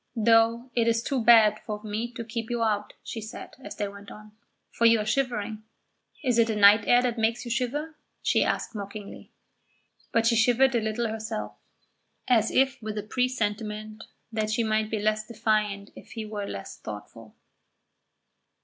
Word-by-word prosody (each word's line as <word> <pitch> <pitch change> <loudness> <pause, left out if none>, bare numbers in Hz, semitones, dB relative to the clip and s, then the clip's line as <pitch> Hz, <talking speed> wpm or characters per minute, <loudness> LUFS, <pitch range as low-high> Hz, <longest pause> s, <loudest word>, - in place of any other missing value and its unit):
"Though 230 +2 +3
it 235 -1 +1
is 230 0 +2
too 260 -3 -1
bad 220 -2 +6
of 210 -1 -5
me 220 +3 -3
to 235 - -5
keep 225 0 -5
you 240 -1 0
out," 210 -2 -1
she 225 - -6
said, 220 +2 -8
as - - -7
they 205 - -2
went 200 0 -11
on, 215 0 -12 0.4
"for 235 - 0
you 230 0 +6
are 210 - -2
shivering. 220 -3 -1 0.6
Is 245 -3 +2
it 230 - +5
the 220 - -1
night 205 +1 +6
air 245 0 +5
that 240 -2 -1
makes 230 +3 0
you 240 - -5
shiver?" 280 +6 -2 0.3
she - - +3
asked - - -2
mockingly. 200 -1 -8 0.8
But 230 0 +2
she 230 0 +4
shivered 250 +3 +4
a 235 - +2
little 220 +2 -1
herself, 220 0 -4 0.7
as 225 -3 +3
if 265 -1 +2
with 215 -1 -5
a 210 - -2
presentiment 215 -2 -2 0.3
that 215 -1 -1
she 225 +2 +1
might 215 -1 0
be 220 - -1
less 215 +1 0
defiant 215 -3 -1
if - - -13
he 225 -2 -5
were 210 -1 -5
less 100 - -7
thoughtful. 110 +1 -10
220 Hz, 175 wpm, -27 LUFS, 210-235 Hz, 0.8 s, bad